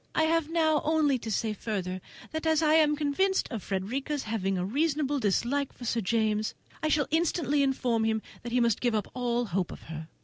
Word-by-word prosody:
I 315 - +3
have 320 -1 +2
now 315 -2 +2
only 300 -4 +2
to 225 - -6
say 220 0 0
further, 185 -3 -3 0.3
that 315 +1 -2
as 320 0 +3
I 305 0 +4
am 305 -2 +5
convinced 310 +7 +1
of 225 -4 -3
Frederica's 260 +11 -2
having 195 -4 -1
a 180 - -1
reasonable 290 - 0
dislike 255 +6 0
to 245 - -8
Sir 230 0 0
James, 215 0 0 0.3
I 310 - +1
shall 300 -2 +2
instantly 315 -3 +2
inform 250 -4 +1
him 220 -1 0 0.2
that 240 - -6
he 250 - +2
must 235 -3 +2
give 240 -3 +1
up 210 - -1
all 245 -1 0
hope 185 -3 -1
of - - -10
her. 160 0 -6
250 Hz, 205 wpm, -29 LUFS, 220-305 Hz, 0.3 s, am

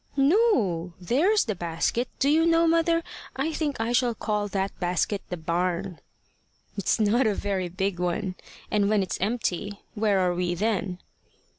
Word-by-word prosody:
"No. 270 - +2
There's 315 - +2
the 220 - -1
basket. 175 +7 -1
Do 275 - +1
you 310 +3 +4
know, 335 0 +4
mother, 330 0 +2 0.3
I 305 +4 -1
think 295 -5 -2
I 225 +1 -1
shall 245 -1 +2
call 210 -1 -1
that 195 -1 -3
basket 180 +3 0
the 180 - -3
barn." 175 +2 -2 0.8
"It's 200 +2 0
not 225 +4 +3
a 210 - +1
very 190 -3 -2
big 190 0 -2
one. 180 +2 -1 0.4
And 205 -1 +2
when 210 -2 +3
it's 185 - -4
empty 205 -2 -2
where 210 -2 +1
are 180 -1 +2
we 175 0 -1
then?" 195 -2 -1
205 Hz, 160 wpm, -26 LUFS, 180-250 Hz, 0.8 s, you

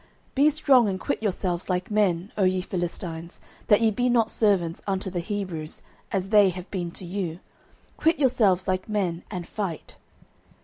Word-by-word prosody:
09:004:009 - - -37
Be 285 +3 +5
strong 275 -7 +4
and 190 -1 -3
quit - - -2
yourselves 185 -4 -2
like 180 +2 -1
men, 195 -3 +1
O 200 - +1
ye 185 0 +2
Philistines, 175 -2 -5 0.3
that 210 +1 +5
ye 225 -1 +4
be 245 +4 +1
not 230 -2 +3
servants 185 -6 +1
unto 190 -1 -2
the 175 - -2
Hebrews, 175 -5 -5 0.3
as 195 -1 -1
they 205 -2 +6
have 180 +1 -7
been 175 -3 -2
to 180 - -8
you: 175 -2 -3 0.6
quit 325 +1 +3
yourselves 220 -10 +3
like 185 +2 -1
men, 185 -5 -1
and 180 -4 -5
fight. 195 -7 -5
190 Hz, 175 wpm, -25 LUFS, 175-215 Hz, 0.6 s, they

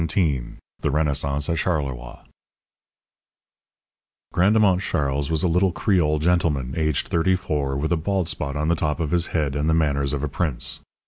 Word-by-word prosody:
XVII 70 -10 0 0.3
THE - - -1
RENAISSANCE 70 -1 0
AT 85 - 0
CHARLEROI 65 -8 -3 2.1
Grandemont 100 0 +3
Charles 70 -5 -1
was 80 -2 0
a - - +3
little 90 +3 +2
Creole 85 -6 +1
gentleman, 75 -5 0
aged 75 -3 0
thirty 90 +3 +2
four, 75 -7 -2
with 80 +4 -2
a 85 - +3
bald 95 +2 -1
spot 70 -3 -2
on 75 +1 -1
the 85 - +3
top 75 0 -1
of 80 -2 -2
his 85 -1 +2
head 75 -4 -1
and 75 +2 0
the 80 - +3
manners 70 -3 +1
of 70 0 -2
a - - 0
prince. 75 -3 -1
75 Hz, 170 wpm, -23 LUFS, 70-85 Hz, 2.1 s, Grandemont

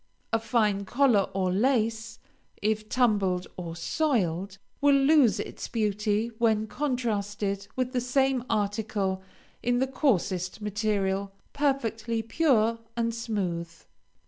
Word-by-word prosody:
A 225 - +3
fine 215 -3 +1
collar 240 -2 +3
or 185 -2 +1
lace, 230 0 +1 0.4
if 215 0 -1
tumbled 200 -7 +2
or 170 -2 -6
soiled, 190 - 0 0.2
will 285 0 +5
lose 270 -7 +4
its - - -5
beauty 215 0 0
when 220 -2 +2
contrasted 205 -6 -2
with 255 0 -1
the 250 - +1
same 265 0 +1
article 205 -3 -1 0.4
in 245 0 +1
the 260 - +2
coarsest 200 - 0
material 200 -2 -1 0.2
perfectly 230 -5 0
pure 230 -4 +2 0.2
and 230 0 0
smooth. 190 -8 -3
220 Hz, 115 wpm, -27 LUFS, 200-245 Hz, 0.4 s, will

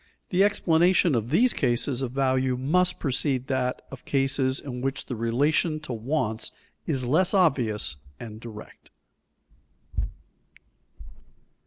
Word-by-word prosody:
The 185 +1 +3
explanation 175 -3 +3
of 115 -1 -1
these 235 - +4
cases 120 +2 0
of 130 -3 -2
value 130 -1 +1
must 180 +8 +1
precede 135 -2 0
that 130 -1 -1
of 135 - -10
cases 135 -1 +1
in 125 -3 -6
which 135 +1 -2
the 125 - -5
relation 145 +8 +1
to 140 -5 -6
wants 115 -1 -2 0.4
is 130 -2 -1
less 175 - +2
obvious 120 - +2 0.2
and 110 -2 -8
direct. 110 -2 -11
130 Hz, 120 wpm, -26 LUFS, 120-155 Hz, 0.4 s, these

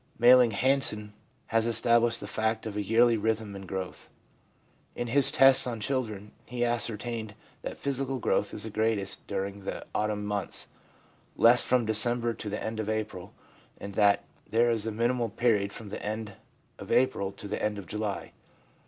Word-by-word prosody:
Malling 125 0 +7
Hansen 105 -3 +2 0.3
has 115 0 +1
established 115 0 +2
the - - -6
fact 110 0 -1
of 110 -2 -5
a 105 - -1
yearly 115 +3 +3
rhythm 110 -1 -2
in 95 -1 -9
growth. 95 -1 -6 0.9
In 120 - -3
his 135 +3 +3
tests 135 -1 +6
on 120 -2 -4
children, 105 -4 -3 0.2
he 120 0 -1
ascertained 115 -2 -3 0.3
that - - -6
physical 135 -1 -2
growth 105 -3 0
is 105 - -5
greatest 110 -2 -1
during 100 0 -3
the 95 - -6
autumn 105 -1 -1
months, 105 -2 -3 0.7
less 120 +2 +6
from 125 -2 +2
December 120 +2 +2
to 110 - -6
the 105 - -4
end 110 0 -4
of 110 -1 -2
April, 110 -4 -4 0.4
and 100 - -7
that 100 -1 +3 0.3
there 120 +1 +3
is 110 -1 -1
a - - -1
minimal 120 +2 0
period 105 -3 +1
from 110 -1 -9
the 100 - -6
end 105 -1 -4 0.5
of - - -8
April 125 -7 +2
to 105 - -7
the - - -4
end 105 -1 -1
of 100 - -7
July. 105 -1 -4
110 Hz, 170 wpm, -28 LUFS, 105-120 Hz, 0.9 s, Malling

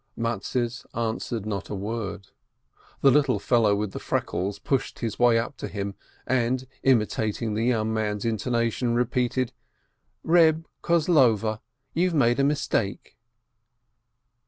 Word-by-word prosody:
Mattes 120 +1 -2
answered 115 -1 -2
not 105 -2 -4
a - - -3
word. 100 -1 -5 0.7
The 135 - +6
little 140 -4 +3
fellow 110 -1 +3
with 105 -1 -2
the - - -6
freckles 95 +3 -2
pushed 135 +5 -2
his 115 -3 -4
way 120 -1 +5
up 120 +4 -3
to - - -5
him, 100 -1 -4 0.3
and 130 0 0 0.2
imitating 110 -3 +1
the 110 +2 0
young 110 -3 +1
man's 105 -1 -1
intonation, 115 +1 0
repeated, 125 +1 0 0.7
"Reb 165 -1 +4 0.2
Kozlover, 130 - +3 0.3
you've 175 +1 +1
made 120 -3 +3
a - - +4
mistake!" 140 -8 -1
115 Hz, 125 wpm, -25 LUFS, 110-130 Hz, 0.7 s, The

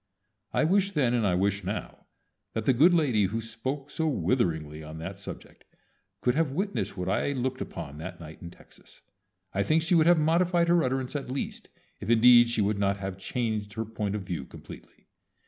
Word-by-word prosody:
I - - +2
wished 195 +3 +2
then 130 -5 +2
and 115 -4 +2
I 90 - +2
wish 100 +2 0
now 100 +3 -5 0.5
that 110 - -2
the 130 - +3
good 155 +9 +6
lady 135 - +3
who 105 +5 -2
spoke 130 +5 -5
so 160 -1 -1
witheringly 80 - 0
on 80 +1 -9
that 95 +4 -7
subject - - -10 0.6
could 125 - +2
have 150 -1 0
witnessed 195 - -2
what 90 0 -3
I 140 +8 0
looked 130 0 -2
upon 75 +2 -6
that 80 - -7
night 80 -1 -11
in 85 - -7
Texas. - - -18 0.5
I 100 - +1
think 155 +9 +2
she 170 +3 0
would 165 -2 +5
have 175 0 +6
modified 170 +2 +2
her 175 -1 +4
utterance 130 +1 -2
at 140 -3 -3
least, 135 +2 -5 0.3
if - - -6
indeed 120 +1 +7
she 115 -2 0
would 100 0 0
not 100 0 +1
have 95 -1 -5
changed 110 -1 -2
her 115 +2 -3
point 105 -2 -3
of 105 - -4
view 85 -6 -4
completely. - - -13
115 Hz, 200 wpm, -28 LUFS, 100-145 Hz, 0.6 s, indeed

